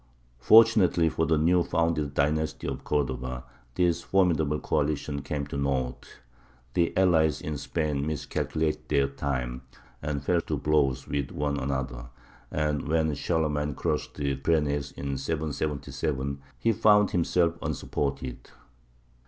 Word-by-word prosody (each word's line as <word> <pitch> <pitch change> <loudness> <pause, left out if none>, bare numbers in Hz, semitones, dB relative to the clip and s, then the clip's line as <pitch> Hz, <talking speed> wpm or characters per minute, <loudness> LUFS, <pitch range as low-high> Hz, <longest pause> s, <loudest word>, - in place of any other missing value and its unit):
Fortunately 100 - +6
for 80 0 0
the 80 0 +3
newly 85 +3 +3
founded 80 -4 0
dynasty 75 +2 0
of - - -4
Cordova, 65 -3 -2 0.3
this 90 -2 +2
formidable 80 -6 +2
coalition 75 -1 -1
came 70 +1 -3
to 70 0 -5
naught. 65 -3 -3 0.5
The 85 -1 +2
allies 80 -6 +3
in 75 - -4
Spain 75 -3 -1
miscalculated 80 +1 -2
their 70 -2 +3
time, 65 -3 -3 0.4
and 75 -1 -3
fell 85 +3 +2
to - - -3
blows 70 -4 +1
with 70 -2 -2
one 70 0 -2
another; 65 -3 -3 0.4
and 75 -1 -1
when 80 -1 +1
Charlemagne 75 -2 -1
crossed - - -2
the 70 -2 -1
Pyrenees 75 -1 0
in 70 -1 -4
777, 70 -2 -3 0.2
he 115 - +2
found 105 -1 +4
himself 85 -1 +1
unsupported. 65 -3 -3
75 Hz, 125 wpm, -27 LUFS, 70-80 Hz, 0.5 s, Fortunately